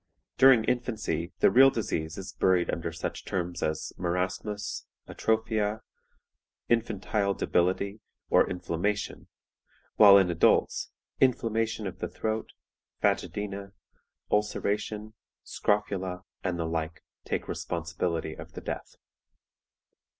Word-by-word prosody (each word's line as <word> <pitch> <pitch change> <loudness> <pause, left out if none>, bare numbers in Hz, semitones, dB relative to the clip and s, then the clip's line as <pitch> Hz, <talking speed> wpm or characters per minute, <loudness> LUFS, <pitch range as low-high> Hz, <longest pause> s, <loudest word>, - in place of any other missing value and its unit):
During 130 -4 +7
infancy 110 -9 -1
the - - +6
real 135 +2 +8
disease 80 -10 -3
is 95 0 -7
buried 90 -2 +2
under 85 0 -3
such 80 0 -5
terms 90 -1 -3
as 80 0 -2
Marasmus, 90 +4 -2 0.2
Atrophia, 110 -1 0 0.9
Infantile 105 -3 +1
Debility, 95 +4 0 0.3
or - - +4
Inflammation, 90 +3 -2 0.7
while 100 -2 +10
in 95 -3 +4
adults, 85 - +2 0.3
Inflammation 115 -4 +1
of 95 -1 -5
the - - -2
Throat, 110 0 -3 0.5
Phagedæna, 100 -1 -1 0.6
Ulceration, 105 +1 -1 0.3
Scrofula, 95 -3 -1 0.2
and 90 -2 -1
the 85 - -1
like, 80 0 -3 0.2
take - - -1
the - - -16
responsibility 85 -1 -2
of - - -11
the - - -7
death. - - -6
100 Hz, 105 wpm, -28 LUFS, 85-110 Hz, 0.9 s, while